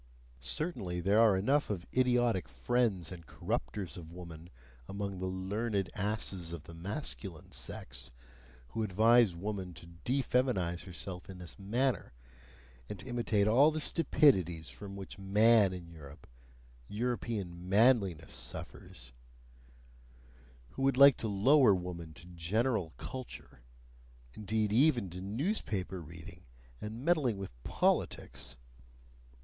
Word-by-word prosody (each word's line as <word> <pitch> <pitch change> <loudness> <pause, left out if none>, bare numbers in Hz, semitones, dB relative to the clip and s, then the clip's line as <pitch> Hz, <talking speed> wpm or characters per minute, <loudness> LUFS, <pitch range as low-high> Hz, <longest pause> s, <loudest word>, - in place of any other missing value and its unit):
Certainly, 90 - -1
there 100 +4 +3
are 110 -4 +5
enough 135 +10 +2
of 95 -5 -3
idiotic 120 - +2
friends 95 - 0
and 85 -4 -10
corrupters 90 +10 -3
of 80 -2 -9
woman 85 -1 -10 0.4
among 100 -1 -4
the 95 - -2
learned 95 +2 -2
asses 100 -4 -2
of 85 -3 -7
the 85 - -12
masculine 95 - -5
sex, - - -5 0.6
who 115 - -3
advise 110 0 +4
woman 95 -1 -4
to 80 - -12 0.2
defeminize 125 -9 0
herself 90 +1 -7
in 95 - -8
this 90 +2 -10
manner, 120 - -1 0.8
and - - -5
to - - -9
imitate 115 -5 +1
all 130 +8 +6
the 155 0 -2
stupidities 95 - +3
from 100 -1 -9
which 100 0 -8
"man" 105 +1 +5
in 90 -2 -7
Europe, 75 -3 -12 0.6
European 105 - -3
"manliness," 100 - +3
suffers, 60 0 -6 1.6
who - - -7
would 135 -1 +2
like 140 -1 +8
to 115 - -3
lower 110 +3 +5
woman 90 -3 -6
to 85 - -12
"general 90 +3 -1
culture," 130 - -8 0.7
indeed 105 0 -1
even 120 - +3
to 90 +1 -7
newspaper 100 - -2
reading 80 +1 -11 0.4
and 110 +5 -6
meddling 150 - +2
with 95 -1 -6
politics. - - -1
100 Hz, 120 wpm, -32 LUFS, 90-120 Hz, 1.6 s, like